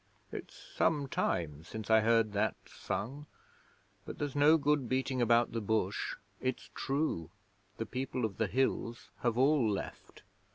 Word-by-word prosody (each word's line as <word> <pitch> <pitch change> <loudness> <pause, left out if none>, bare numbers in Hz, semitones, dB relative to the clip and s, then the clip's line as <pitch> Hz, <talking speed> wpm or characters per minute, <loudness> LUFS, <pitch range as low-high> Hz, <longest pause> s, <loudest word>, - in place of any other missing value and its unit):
'It's - - -7
some 145 -4 0
time 80 - -1
since 110 +5 -5
I 110 - +8
heard 115 -1 +3
that 105 +1 +1
sung, 140 +8 -5 0.8
but - - -7
there's 145 -2 -3
no 150 +3 +6
good 145 -4 +1
beating 130 0 0
about 120 0 +4
the 115 - -2
bush: 105 -2 0 0.3
it's 130 -1 -3
true. 135 - -1 0.5
The 115 - -2
People 130 -1 -2
of 100 -3 -4
the 110 - +1
Hills 130 +2 -1
have 120 -1 0
all 135 -3 +4
left. 100 - -6
120 Hz, 150 wpm, -33 LUFS, 110-135 Hz, 0.8 s, I